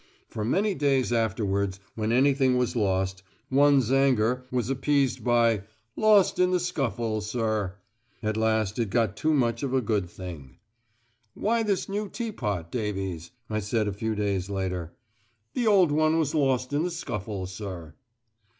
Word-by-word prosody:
For 110 Hz, -, -4 dB
many 195 Hz, -, +1 dB
days 135 Hz, -6 st, +1 dB
afterwards 100 Hz, -4 st, 0 dB
when 110 Hz, 0 st, -2 dB
anything 130 Hz, 0 st, +3 dB
was 125 Hz, 0 st, 0 dB
lost, 95 Hz, -3 st, 0 dB, 0.3 s
one's 140 Hz, -3 st, +4 dB
anger 125 Hz, -2 st, +2 dB
was 125 Hz, -3 st, -1 dB
appeased 135 Hz, -1 st, +1 dB
by 115 Hz, -3 st, +3 dB, 0.3 s
"Lost 210 Hz, -4 st, +4 dB
in 180 Hz, 0 st, +4 dB
the 180 Hz, 0 st, +2 dB
scuffle, 120 Hz, -, -2 dB
sir." 110 Hz, -3 st, -2 dB, 0.5 s
At 110 Hz, 0 st, 0 dB
last 110 Hz, -1 st, 0 dB
it 115 Hz, -3 st, 0 dB
got 110 Hz, -2 st, +1 dB
too 155 Hz, +8 st, 0 dB
much 120 Hz, -6 st, +1 dB
of 135 Hz, -2 st, -1 dB
a -, -, +4 dB
good 105 Hz, -6 st, -1 dB
thing. 85 Hz, -8 st, -9 dB, 0.8 s
"Why 230 Hz, +2 st, +1 dB
this 205 Hz, -4 st, 0 dB
new 205 Hz, +1 st, -3 dB
teapot, 105 Hz, -, -4 dB
Davies?" 95 Hz, -7 st, -3 dB, 0.2 s
I 110 Hz, -1 st, -1 dB
said 105 Hz, +1 st, -1 dB
a 100 Hz, -, -2 dB
few 110 Hz, +2 st, -2 dB
days 100 Hz, -2 st, -1 dB
later. 90 Hz, -4 st, -3 dB, 0.6 s
"The 240 Hz, -2 st, 0 dB
old 190 Hz, -7 st, +5 dB
one 155 Hz, +2 st, +3 dB
was 155 Hz, -2 st, 0 dB
lost 135 Hz, -3 st, +1 dB
in 145 Hz, -, +2 dB
the 180 Hz, -, 0 dB
scuffle, 105 Hz, -, -4 dB
sir." 90 Hz, -4 st, -7 dB
115 Hz, 155 wpm, -27 LUFS, 100-140 Hz, 0.8 s, old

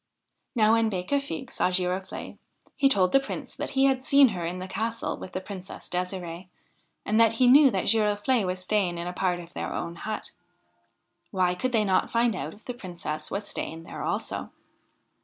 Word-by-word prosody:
Now 215 Hz, -2 st, +5 dB
when 230 Hz, -1 st, +3 dB
Becafigue 265 Hz, +8 st, -2 dB
saw -, -, +1 dB
Girofle'e, 185 Hz, +1 st, -2 dB, 0.4 s
he 275 Hz, -1 st, +4 dB
told 185 Hz, -7 st, +3 dB
the 270 Hz, -, +6 dB
Prince 270 Hz, -, -6 dB
that -, -, -3 dB
he 270 Hz, -, +6 dB
had 265 Hz, -1 st, +2 dB
seen 275 Hz, -1 st, +6 dB
her 180 Hz, -5 st, -4 dB
in 170 Hz, +2 st, -3 dB
the 185 Hz, +1 st, -5 dB
castle 225 Hz, +4 st, -2 dB
with 185 Hz, -, -9 dB
the -, -, -1 dB
Princess 190 Hz, -1 st, -8 dB
D6sir6e, 180 Hz, -1 st, -4 dB, 0.6 s
and 215 Hz, +2 st, +3 dB
that 225 Hz, -1 st, +5 dB
he 250 Hz, +3 st, +3 dB
knew 275 Hz, +3 st, +8 dB
that 190 Hz, -6 st, -1 dB
Giroflee 215 Hz, +2 st, +2 dB
was 185 Hz, 0 st, -1 dB
staying 185 Hz, -1 st, 0 dB
in 170 Hz, -, -4 dB
a 180 Hz, -, -4 dB
part 180 Hz, -1 st, 0 dB
of 175 Hz, 0 st, -11 dB
their -, -, -4 dB
own 170 Hz, 0 st, -4 dB
hut. 215 Hz, +4 st, -5 dB, 1.0 s
Why 180 Hz, -2 st, +2 dB
could 255 Hz, +8 st, -2 dB
they 220 Hz, -3 st, +2 dB
not 190 Hz, -2 st, +2 dB
find 235 Hz, -2 st, +2 dB
out -, -, -5 dB
if 215 Hz, -, -21 dB
the 250 Hz, -, -4 dB
Princess 170 Hz, -8 st, -6 dB
was 200 Hz, +1 st, -4 dB
staying 165 Hz, +1 st, -5 dB
there -, -, -8 dB
also? -, -, -2 dB
195 Hz, 195 wpm, -27 LUFS, 180-230 Hz, 1.0 s, knew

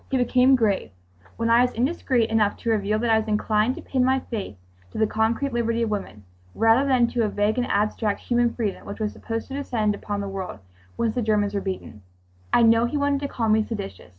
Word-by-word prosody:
He 270 Hz, -, +1 dB
became 255 Hz, +1 st, +4 dB
grave. 215 Hz, -6 st, 0 dB, 0.5 s
When 230 Hz, 0 st, 0 dB
I 235 Hz, +1 st, +6 dB
was 250 Hz, 0 st, +1 dB
indiscreet 250 Hz, -2 st, 0 dB
enough 215 Hz, -2 st, +2 dB
to 230 Hz, -, -2 dB
reveal 210 Hz, -1 st, +1 dB
that 230 Hz, +1 st, 0 dB
I 220 Hz, -, +5 dB
was 220 Hz, -, -5 dB
inclined 215 Hz, +3 st, +1 dB
to -, -, -9 dB
pin 260 Hz, -2 st, 0 dB
my 260 Hz, +1 st, +2 dB
faith 210 Hz, -, -6 dB, 0.3 s
to -, -, -10 dB
the 220 Hz, -, +3 dB
concrete 225 Hz, +5 st, 0 dB
liberty 230 Hz, 0 st, 0 dB
of 220 Hz, -, -2 dB
women, 150 Hz, -, -5 dB, 0.3 s
rather 225 Hz, +5 st, +4 dB
than 250 Hz, -2 st, +4 dB
to 235 Hz, -, 0 dB
a 215 Hz, -, +1 dB
vague 205 Hz, +4 st, 0 dB
and 245 Hz, -, 0 dB
abstract 210 Hz, 0 st, 0 dB
"human 240 Hz, -1 st, +1 dB
freedom," 215 Hz, -5 st, -3 dB
which 200 Hz, -, -7 dB
was 215 Hz, -1 st, -2 dB
supposed 225 Hz, 0 st, -5 dB
to -, -, -7 dB
descend 235 Hz, -7 st, -1 dB
upon 205 Hz, 0 st, -4 dB
the 200 Hz, -, -3 dB
world, 195 Hz, -, -5 dB, 0.4 s
once 230 Hz, -2 st, 0 dB
the 250 Hz, -, -1 dB
Germans 210 Hz, -2 st, +1 dB
were 200 Hz, -, -1 dB
beaten, 185 Hz, -, -6 dB, 0.5 s
I 240 Hz, -, +4 dB
know 230 Hz, +1 st, +5 dB
he 265 Hz, +5 st, -2 dB
wanted 285 Hz, 0 st, +1 dB
to 285 Hz, -, -3 dB
call 230 Hz, -4 st, -2 dB
me 215 Hz, 0 st, +4 dB
"seditious." 205 Hz, -, -7 dB
225 Hz, 230 wpm, -24 LUFS, 210-245 Hz, 0.5 s, I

